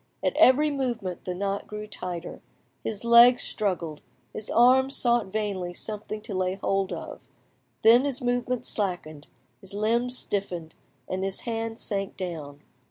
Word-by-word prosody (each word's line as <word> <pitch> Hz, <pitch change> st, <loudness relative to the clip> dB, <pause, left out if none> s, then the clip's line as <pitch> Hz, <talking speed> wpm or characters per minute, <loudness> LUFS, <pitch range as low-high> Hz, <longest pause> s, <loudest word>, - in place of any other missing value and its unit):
At -, -, +1 dB
every 295 Hz, +4 st, +5 dB
movement 235 Hz, -10 st, -3 dB
the 180 Hz, -, -3 dB
knot 200 Hz, +1 st, -2 dB
grew 210 Hz, 0 st, -6 dB
tighter, 180 Hz, -4 st, -6 dB, 0.4 s
his 215 Hz, -1 st, -4 dB
legs 235 Hz, +1 st, +7 dB
struggled, 175 Hz, -7 st, -2 dB, 0.3 s
his 215 Hz, -, -5 dB
arms 260 Hz, +3 st, +5 dB
sought 240 Hz, -3 st, +2 dB
vainly 190 Hz, -4 st, -3 dB
something 215 Hz, +1 st, -6 dB
to 215 Hz, -1 st, -7 dB
lay 185 Hz, 0 st, 0 dB
hold 195 Hz, 0 st, -1 dB
of; -, -, -7 dB, 0.6 s
then 235 Hz, +3 st, +7 dB
his 275 Hz, -2 st, -1 dB
movements 245 Hz, -1 st, -1 dB
slackened, 175 Hz, -7 st, -3 dB, 0.3 s
his 195 Hz, 0 st, -9 dB
limbs 235 Hz, +4 st, +1 dB
stiffened, 180 Hz, -5 st, -3 dB, 0.3 s
and 185 Hz, +1 st, -3 dB
his 195 Hz, 0 st, -3 dB
hands 225 Hz, -1 st, -3 dB
sank 195 Hz, -2 st, -3 dB
down. 155 Hz, -6 st, -6 dB
210 Hz, 145 wpm, -26 LUFS, 185-235 Hz, 0.6 s, legs